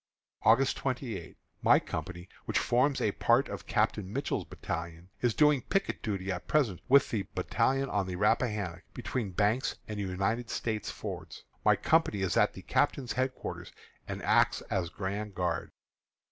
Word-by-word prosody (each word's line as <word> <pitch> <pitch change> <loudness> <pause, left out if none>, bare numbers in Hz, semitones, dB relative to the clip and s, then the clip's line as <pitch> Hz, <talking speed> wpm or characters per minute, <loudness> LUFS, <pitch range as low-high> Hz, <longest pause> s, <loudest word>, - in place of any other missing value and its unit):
August 130 +4 +4
28. 120 - -4 0.2
My - - +6
company, 90 0 -6 0.2
which - - 0
forms 130 +4 +2
a 105 - +2
part - - +3
of - - -7
Captain 100 -2 0
Mitchell's 140 +5 -2
battalion, 85 +1 -6
is 120 -3 +2
doing 150 -3 +5
picket 195 +9 -1
duty 95 -3 -2
at 90 - -5
present 125 - +1
with 140 +1 +6
the 105 -4 -1
battalion 135 +1 +1
on 100 -6 -1
the 90 - -3
Rappahannock 105 -4 +1
between 120 -2 -3
Banks 105 +7 +1
and 105 -1 -5
United 100 +5 -1
States 110 -3 -2
Fords. - - -7 0.2
My - - +5
company 160 -11 +2
is 95 - 0
at - - +4
the - - -10
captain's 130 -4 +1
headquarters, 130 0 -3 0.4
and - - -5
acts - - +3
as 90 -3 0
grand 100 +2 -4
guard. 85 -3 -1
105 Hz, 155 wpm, -30 LUFS, 95-130 Hz, 0.4 s, My